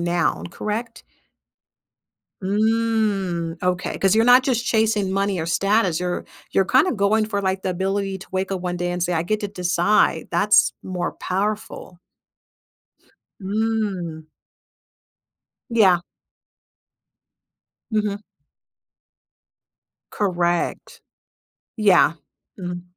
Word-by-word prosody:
now, 175 0 0
correct? 225 +5 -5 1.4
Mm, 205 -5 0
okay, 180 0 -1
'cause 195 +2 +3
you're 225 - +4
not 250 +1 +7
just 245 -3 0
chasing 215 -4 +1
money 195 -1 0
or 160 - -3
status, 195 0 +1
you're 180 0 -2 0.3
you're 195 - +2
kinda 260 - +3
going 215 0 +2
for, 200 -2 -2
the 190 -1 -1
ability 195 +1 -2
to 190 - -12
wake 190 +1 -2
up 190 -2 -2
one 180 -1 -3
day 175 0 -2
and 175 0 -2
say, 175 0 0
"I 160 - +1
get 215 +5 -1
to 205 - -3
decide." 180 +1 +1
That's 210 0 +4
more 180 -2 -3
powerful. 205 -1 -4 1.4
Mm. 200 -5 -2 1.5
Yeah. 195 -7 +4 1.9
Mhm. 210 -1 -1 1.9
Correct. 175 -4 -1 0.8
Yeah, 195 -6 +4 0.4
mhm 180 -1 -5
195 Hz, 100 wpm, -22 LUFS, 180-215 Hz, 1.9 s, not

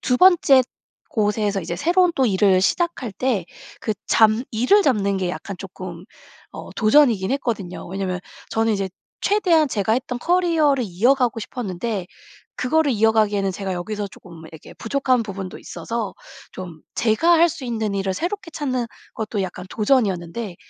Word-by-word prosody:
2 250 - +1
번째 325 -6 +6 0.5
곳에서 210 -2 0
이제 170 +1 -4
새로운 350 - +3
또 265 - +3
일을 190 -2 +3
시작할 310 - 0
때 235 -5 -1 0.4
그 220 - -1
잡 220 -1 +5 0.2
일을 255 - +4
잡는 200 - +1
게 185 -1 -1
약간 195 +2 -6
쪼끔 185 -2 -8 0.5
어 - - -9
도전이긴 220 -4 +4
했거든요. 220 -10 -3
왜냐하면 185 -1 -3 0.3
저는 225 0 +1
이제 195 -2 -1 0.3
최대한 350 -7 +3
제가 220 -3 0
했던 250 +1 -1
커리어를 320 -5 +2
이어가고 240 +6 +2
싶었는데 205 -3 -4 0.5
그거를 300 +2 +2
이어가기에는 215 -3 +2
제가 190 0 -4
여기서 205 +3 -4
쪼끔 170 -4 -14
이렇게 160 - -12
부족한 255 0 0
부분도 195 -2 -6
있어서 215 +4 -5 0.4
좀 175 -4 -8
제가 235 +10 +3
할 340 0 +6
수 300 -3 -8
있는 220 -4 -2
일을 195 -1 -1
새롭게 350 - -4
찾는 255 -5 -2 0.3
것도 215 -2 -2
약간 180 0 -6
도전이었는데 210 -4 0
220 Hz, 335 characters per minute, -22 LUFS, 195-265 Hz, 0.5 s, 번째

